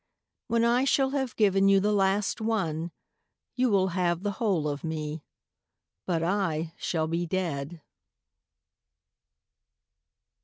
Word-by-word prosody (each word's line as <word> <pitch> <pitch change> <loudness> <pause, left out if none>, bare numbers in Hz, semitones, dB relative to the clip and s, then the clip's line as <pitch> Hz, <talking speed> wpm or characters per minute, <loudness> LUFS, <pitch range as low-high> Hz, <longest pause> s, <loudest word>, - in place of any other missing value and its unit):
When 230 0 +1
I 240 +2 +3
shall 270 -1 +2
have 265 -4 -2
given 195 -2 +3
you 195 0 +5
the 205 +2 +1
last 200 +2 +1
one, 175 -8 -1 0.6
You 255 0 +1
will 190 -2 +2
have 175 0 0
the 205 - 0
whole 185 -9 +1
of 145 -1 -4
me, 155 -1 -4 0.9
But 165 -3 0
I 165 -4 -1
shall 160 -2 -1
be 170 +2 -2
dead. 165 -3 -3
190 Hz, 120 wpm, -27 LUFS, 165-210 Hz, 0.9 s, you